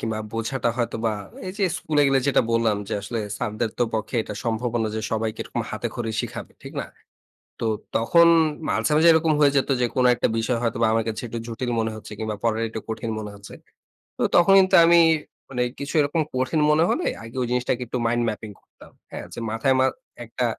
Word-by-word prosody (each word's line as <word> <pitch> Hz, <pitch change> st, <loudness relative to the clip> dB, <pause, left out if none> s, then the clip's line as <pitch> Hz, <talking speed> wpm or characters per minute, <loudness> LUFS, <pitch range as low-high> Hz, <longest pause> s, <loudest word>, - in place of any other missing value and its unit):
কিংবা 110 Hz, -1 st, -2 dB
বোঝাটা 120 Hz, +2 st, -1 dB
হয়তো 120 Hz, -2 st, -1 dB
বা 110 Hz, -, +1 dB, 0.3 s
এই 185 Hz, -, -4 dB
যে, 200 Hz, -, +2 dB
স্কুলে 150 Hz, -2 st, +1 dB
গেলে 135 Hz, -1 st, +3 dB
যেটা 140 Hz, -, +3 dB
বললাম, 115 Hz, -2 st, +2 dB
যে, -, -, -4 dB
আসলে 110 Hz, +3 st, -4 dB, 0.2 s
স্যারদেরতো 110 Hz, 0 st, -2 dB
পক্ষে 110 Hz, +2 st, -2 dB
এটা 105 Hz, -, -7 dB
সম্ভবও 120 Hz, +1 st, -1 dB
না 110 Hz, -, 0 dB
যে, -, -, -1 dB
সবাইকে 110 Hz, 0 st, -2 dB
এরকম -, -, -4 dB
হাতেখড়ি 115 Hz, -2 st, -4 dB
শিখাবে। -, -, -7 dB
ঠিক -, -, -9 dB
না? -, -, -5 dB, 0.7 s
তো -, -, -2 dB, 0.3 s
তখন 170 Hz, +9 st, +5 dB, 0.4 s
মাঝে, -, -, 0 dB
মাঝে 160 Hz, +2 st, +6 dB
এরকম 160 Hz, 0 st, +3 dB
হয়ে 145 Hz, -1 st, +5 dB
যেত 135 Hz, -, +2 dB
যে, 125 Hz, -, +3 dB
কোন 130 Hz, -, +3 dB
একটা -, -, 0 dB
বিষয় 115 Hz, +1 st, 0 dB
হয়তো 115 Hz, -2 st, -1 dB
বা -, -, +5 dB
আমার 115 Hz, 0 st, +1 dB
কাছে 110 Hz, -, -4 dB
একটু 115 Hz, +1 st, -5 dB
জটিল 120 Hz, +2 st, -4 dB
মনে 110 Hz, 0 st, -1 dB
হচ্ছে 110 Hz, -, -10 dB
কিংবা 110 Hz, -1 st, -3 dB
পড়াটা 115 Hz, -1 st, 0 dB
একটু 110 Hz, 0 st, -6 dB
কঠিন 115 Hz, 0 st, -4 dB
মনে 105 Hz, -1 st, -6 dB
হচ্ছে। 100 Hz, 0 st, -12 dB, 0.6 s
তো -, -, -5 dB
তখন 175 Hz, +3 st, +6 dB
কিন্তু 190 Hz, 0 st, +4 dB
আমি 170 Hz, 0 st, +6 dB, 0.5 s
মানে 125 Hz, -2 st, -1 dB, 0.2 s
কিছু 140 Hz, 0 st, -5 dB
এরকম 145 Hz, +3 st, 0 dB
কঠিন 130 Hz, +5 st, 0 dB
মনে 155 Hz, +2 st, +4 dB
হলে -, -, 0 dB, 0.2 s
আগে 115 Hz, +2 st, -11 dB
ওই 125 Hz, -, 0 dB
জিনিসটাকে 125 Hz, 0 st, 0 dB
একটু 125 Hz, -, -3 dB
mind 120 Hz, +1 st, +1 dB
mapping 105 Hz, 0 st, -6 dB
করতাম। -, -, -19 dB, 0.2 s
হ্যাঁ, -, -, -6 dB
যে, -, -, -6 dB
মাথায় 120 Hz, +4 st, +1 dB
মা 130 Hz, -, +4 dB, 0.4 s
একটা 120 Hz, +2 st, -2 dB
120 Hz, 205 wpm, -24 LUFS, 110-135 Hz, 0.7 s, মাঝে